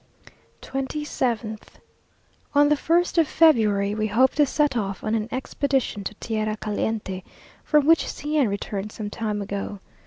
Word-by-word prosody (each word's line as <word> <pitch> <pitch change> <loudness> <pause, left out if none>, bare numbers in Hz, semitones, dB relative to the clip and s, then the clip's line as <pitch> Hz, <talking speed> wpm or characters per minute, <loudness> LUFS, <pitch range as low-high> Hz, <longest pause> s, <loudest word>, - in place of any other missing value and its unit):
27th. 260 -5 -2 0.9
On 290 0 +6
the 300 - +4
first 340 +3 +2
of 320 - +4
February 215 -12 +4
we 215 0 -1
hope 250 +5 +3
to 295 -1 +3
set 295 -1 +1
off 195 -4 -3
on 215 - -1
an 220 0 -1
expedition 265 -4 -1
to 215 - -5
tierra 215 -1 -2
caliente, 210 -2 -3 0.4
from 300 -2 +3
which 330 +1 +4
C 300 +1 -4
n 285 -5 +4
returned 200 0 -4
some 210 -1 -6
time 210 -2 -2
ago. 200 0 -5
225 Hz, 150 wpm, -24 LUFS, 210-290 Hz, 0.9 s, On